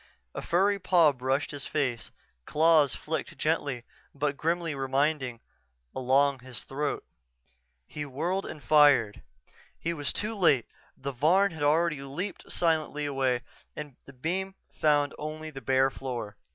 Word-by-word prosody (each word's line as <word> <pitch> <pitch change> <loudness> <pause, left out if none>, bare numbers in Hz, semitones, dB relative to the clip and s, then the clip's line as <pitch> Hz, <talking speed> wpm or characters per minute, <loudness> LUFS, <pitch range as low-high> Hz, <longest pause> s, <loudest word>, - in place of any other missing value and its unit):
_" - - -27 0.3
A - - -4
furry 200 +3 +2
paw 175 -5 +5
brushed 135 +1 -1
his 145 -2 -6
face, 130 -6 -1 0.4
claws 155 -3 +4
flicked 160 +1 -4
gently 145 -6 -1 0.3
but 145 0 -1
grimly 165 +2 -1
reminding 135 -2 0 0.5
along 135 +2 +3
his 125 -3 -7
throat. 145 +2 -3 0.8
He 150 - -6
whirled 165 +8 -2
and 150 - -8
fired. 145 -8 +5 0.6
He 170 - -2
was 145 -3 -2
too 215 +2 -2
late 165 - +3 0.3
the 140 +1 -4
Varn 175 +10 +3
had 160 -2 -9
already 155 0 +2
leaped 150 +9 -6
silently 155 -3 0
away 130 -3 0 0.3
and 150 -3 -7
the 140 - -13
beam 185 +8 -3 0.2
found 145 -2 +2
only 155 +1 -5
the 135 -2 -8
bare 135 0 +3
floor. 120 -6 -5
145 Hz, 140 wpm, -28 LUFS, 135-160 Hz, 0.8 s, paw